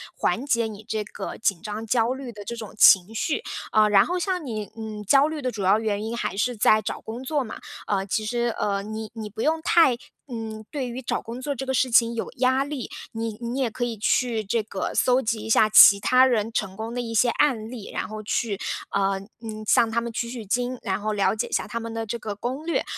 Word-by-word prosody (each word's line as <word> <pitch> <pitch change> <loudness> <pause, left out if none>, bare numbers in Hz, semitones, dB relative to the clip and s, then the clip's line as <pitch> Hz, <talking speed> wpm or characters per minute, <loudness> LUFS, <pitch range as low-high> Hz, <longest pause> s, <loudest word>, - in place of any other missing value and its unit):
缓 250 - 0
解 235 -5 +1
你 215 -1 -10
这 220 -2 -2
个 210 - -7
紧 200 -7 0
张、 215 +1 -5
焦 230 +1 +2
虑 265 -2 -7
的 205 -2 -10
这 235 - -4
种 225 -2 -8
情 195 0 +6
绪。 305 - -1 0.3
呃， 215 -1 +5
然 200 -1 +6
后 360 - -1
像 360 -2 -2
你 215 -5 -5
嗯， 215 -1 -6
焦 275 +8 +5
虑 310 -1 -4
的 255 -1 -1
主 210 -4 -5
要 190 +3 +5
原 210 -1 -1
因 225 +1 -3
还 215 - -3
是 245 +4 0
在 215 0 +4
找 215 - -5
工 225 +3 -7
作 280 +2 -1
嘛， 220 - -7 0.3
呃， 195 -2 0
其 215 +2 -1
实， 240 +1 -1
呃， 200 -1 0
你 215 +1 -6
你 220 -2 -6
不 220 +2 -6
用 320 +3 +1
太 320 -8 +4 0.3
嗯， 220 -3 -6
对 270 -4 -3
于 250 +2 -6
找 - - -1
工 235 +1 -7
作 285 +2 -2
这 270 0 -6
个 265 - 0
事 255 0 +1
情 230 0 +4
有 225 - -4
压 260 +2 +3
力。 280 -4 -5 0.2
你 225 -1 -4
你 240 +3 -3
也 255 -3 +1
可 240 - -3
以 235 -2 -2
去 225 +1 +1
这 215 +3 0
个 200 -2 -4
搜 255 +1 +3
集 225 -2 -1
一 220 - -6
下 220 - +5
其 200 -1 +9
他 255 +5 +5
人 230 -4 +1
成 195 -4 -2
功 225 +3 -5
的 245 - -2
一 230 -1 -5
些 240 +2 +4
案 235 -4 +1
例， 230 -5 -8
然 - - -3
后 215 0 -7
去， 205 -1 -1 0.3
呃， 195 -1 +1 0.2
嗯， 215 -2 -6
向 225 +3 +4
他 235 +1 0
们 235 0 -5
取 235 +1 -3
取 235 -3 -7
经， 245 +5 -1
然 195 -2 -1
后 215 +1 -1
了 195 -2 +2
解 220 - -2
一 - - -15
下 - - 0
他 225 +3 -4
们 230 0 -6
的 225 0 -3
这 225 +2 -3
个 210 -2 -5
攻 255 +8 -4
略。 335 - 0
225 Hz, 265 characters per minute, -24 LUFS, 215-250 Hz, 0.3 s, 其